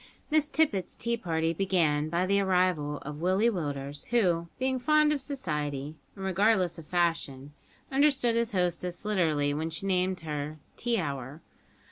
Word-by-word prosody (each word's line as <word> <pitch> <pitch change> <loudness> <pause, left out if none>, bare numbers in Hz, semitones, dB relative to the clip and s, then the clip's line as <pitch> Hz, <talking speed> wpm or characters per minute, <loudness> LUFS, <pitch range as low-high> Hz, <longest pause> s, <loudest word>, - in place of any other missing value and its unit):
Miss 305 -1 +3
Tippet's 290 - +1
tea 235 +1 0
party 165 -6 -1
began 160 -5 +1
by 170 +3 +1
the 200 +1 +2
arrival 180 -6 +1
of 150 +1 -7
Willie 190 +6 +3
Willders, 145 -6 -4
who, 180 -8 +2
being 260 0 0
fond 305 +3 +4
of 285 - -2
society, 150 - -3 0.2
and 195 -1 -6
regardless 190 -2 +2
of 155 - -12
fashion, 150 -6 -1 0.4
understood 270 -3 +3
his 235 -1 +1
hostess 180 0 -1
literally 155 -8 +1
when 160 +2 -2
she 165 +4 -4
named 185 -1 +1
her 150 -1 -4 0.2
tea 240 -1 0
hour! 140 -1 -5
180 Hz, 150 wpm, -29 LUFS, 150-220 Hz, 0.4 s, fond